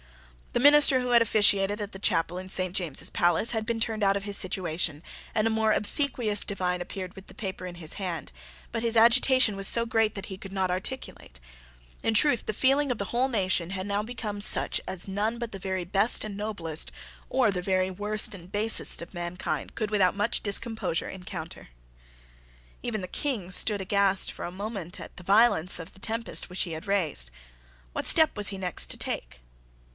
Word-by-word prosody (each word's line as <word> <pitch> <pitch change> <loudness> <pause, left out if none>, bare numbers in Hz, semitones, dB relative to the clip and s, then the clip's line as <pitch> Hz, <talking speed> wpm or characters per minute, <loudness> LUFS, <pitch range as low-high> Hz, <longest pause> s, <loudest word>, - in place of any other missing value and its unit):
The - - +1
minister 290 0 +8
who 250 0 -2
had 235 -1 +6
officiated 205 -2 +3
at 205 0 -5
the 190 - -9
chapel 175 -1 0
in 185 0 -9
Saint 185 -1 -1
James's 170 -8 0
Palace 175 +6 +2
had 220 -2 -2
been 230 -1 -1
turned 225 -2 -1
out 195 0 +3
of 200 - -6
his 205 0 -2
situation, 175 -5 -1 0.3
and 215 - +2
a - - +1
more 220 0 +1
obsequious 220 -3 +3
divine 180 -2 -2
appeared 185 0 -6
with 195 - -13
the - - -14
paper 190 -3 -6
in 175 - -8
his 160 -3 -5
hand: 175 - -5 0.4
but 230 - -3
his 230 0 +1
agitation 240 0 +5
was 195 0 0
so 235 0 +3
great 225 -2 +1
that 195 -1 -6
he 190 - -8
could 195 - -9
not 190 -2 -1
articulate. 185 - -5 0.6
In 225 - +1
truth 240 +1 +3
the - - 0
feeling 270 +5 +2
of 245 - -2
the 200 - -3
whole 255 +3 +2
nation 185 -7 0
had 190 0 -4
now 205 0 -1
become 215 -3 -6
such - - +2
as 185 0 -6
none 210 +4 -2
but 235 -1 -5
the 195 - -7
very 190 -1 -3
best 200 +5 +2
and 210 -2 -6
noblest, 175 - -2 0.4
or 255 -5 +2
the 180 -2 -3
very 185 0 0
worst 210 +3 -1
and 180 -1 -11
basest, 215 -2 +1
of 170 - -13
mankind 175 0 -4
could 215 -2 -3
without 195 -3 +2
much 210 +3 -1
discomposure 205 -4 0
encounter. 180 - -8 1.1
Even 220 -4 -3
the 185 - -5
King 215 -7 -3
stood 205 +2 +2
aghast 195 0 +2
for - - -7
a 175 - -5
moment 195 -2 -5
at - - -10
the 180 - -11
violence 195 -3 +3
of 165 -2 -10
the - - -16
tempest 225 +1 -3
which 180 +1 -1
he 175 - -6
had 160 +5 -7
raised. 165 - +1 0.6
What - - -2
step 315 -1 +5
was 205 -2 0
he 195 - -4
next 180 -3 0
to - - -1
take? 60 +1 -4
200 Hz, 200 wpm, -27 LUFS, 185-225 Hz, 1.1 s, minister